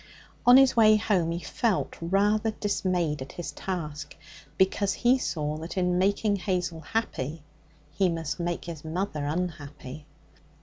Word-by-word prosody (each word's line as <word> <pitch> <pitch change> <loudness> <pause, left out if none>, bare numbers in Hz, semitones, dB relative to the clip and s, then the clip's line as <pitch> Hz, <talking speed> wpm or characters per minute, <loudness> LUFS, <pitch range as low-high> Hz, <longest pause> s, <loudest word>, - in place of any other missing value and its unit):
On 245 +1 +10
his 270 -1 +5
way 215 -2 +6
home 200 -6 +1
he 170 - -2
felt 225 -6 -1
rather 205 +5 +2
dismayed 180 -8 -1
at 130 - -8
his 175 - -5
task, 160 -6 -5 0.4
because 190 +1 +2
he 250 +2 +3
saw 150 -8 -2
that 165 +5 -7
in 180 -1 +1
making 200 +2 +2
Hazel 180 -3 -2
happy 160 - -3 0.5
he 185 +3 +1
must 165 -1 -3
make 175 0 -2
his 165 -3 -7
mother 160 -1 -3
unhappy. 150 -3 -5
180 Hz, 140 wpm, -27 LUFS, 160-200 Hz, 0.5 s, On